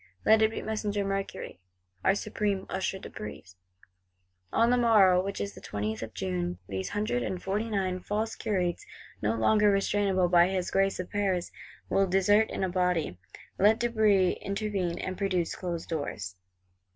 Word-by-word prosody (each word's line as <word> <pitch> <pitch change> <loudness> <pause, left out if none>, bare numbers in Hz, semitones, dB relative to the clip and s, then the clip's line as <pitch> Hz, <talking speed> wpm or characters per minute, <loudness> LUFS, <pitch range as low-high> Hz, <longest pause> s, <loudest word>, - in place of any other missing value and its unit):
Let 220 0 +6
it 220 - +5
be 225 - -5
Messenger 210 -2 -2
Mercury, 195 - -4 0.4
our 195 - +4
Supreme 205 -2 -2
Usher 190 0 -1
de - - -9
Brézé. 105 -3 -9 1.0
On 230 +1 +3
the - - +5
morrow, 205 -7 +5
which 200 +1 -4
is 200 - -3
the - - -12
20th 105 +1 -3
of 110 -2 -7
June, 90 -1 -2
these 95 -1 -3
Hundred 205 -12 -1
and 180 +9 -3
Forty 205 +5 -2
nine 190 -3 -1
false 215 +4 -2
Curates, 180 -4 -1 0.4
no 110 +2 +1
longer 210 - +4
restrainable 195 -2 +2
by 175 0 +5
his 185 -1 -2
Grace 195 0 +1
of 185 - -5
Paris, 195 -4 0 0.4
will 195 0 +2
desert 205 +4 +3
in - - -3
a - - +2
body: 180 - 0 0.4
let 210 +3 +5
De 240 +1 0
Brézé 210 -5 +3
intervene, 200 -4 -2
and 185 0 -5
produce—closed 180 -3 -2
doors! 105 - -4
190 Hz, 165 wpm, -29 LUFS, 175-205 Hz, 1.0 s, Let